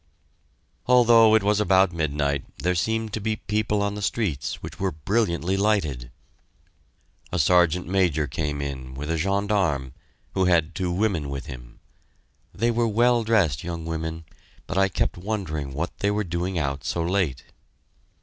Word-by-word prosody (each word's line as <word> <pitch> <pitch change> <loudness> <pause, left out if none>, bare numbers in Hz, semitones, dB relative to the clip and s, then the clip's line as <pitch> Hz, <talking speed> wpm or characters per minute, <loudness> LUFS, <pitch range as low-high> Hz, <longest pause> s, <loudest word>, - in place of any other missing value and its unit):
Although 115 -3 +6
it 110 - +3
was 105 +1 +2
about 95 -2 +3
midnight 70 -3 -1
there 90 +1 0
seemed 110 +4 -1
to 110 - -3
be 110 +1 -1
people 105 -1 -1
on 100 0 -1
the 105 - -6
streets, 95 - -1
which - - -8
were - - 0
brilliantly 90 +2 0
lighted. 95 - 0 1.2
A 90 - -1
Sergeant 90 +2 +3
Major 90 -5 +1
came 75 +1 -3
in, 65 -2 -6
with 75 +4 -4
a 85 - 0
gendarme, 95 -8 0 0.4
who 95 - +2
had 85 -2 +2
two 90 0 -2
women 90 -6 0
with 70 -1 -5
him. - - -10 0.7
They 120 +1 0
were 120 0 +1
well 120 +2 +3
dressed 100 - +2
looking 85 -1 -5
women, 80 0 -4 0.4
but 95 - -5
I 95 0 +3
kept 90 - -1
wondering 85 -8 -3
what 80 +6 -4
they 100 - +1
were 105 +1 0
doing 90 +1 -3
out 70 -3 -2
so 85 - -1
late. 85 -7 0
90 Hz, 160 wpm, -24 LUFS, 75-105 Hz, 1.2 s, Although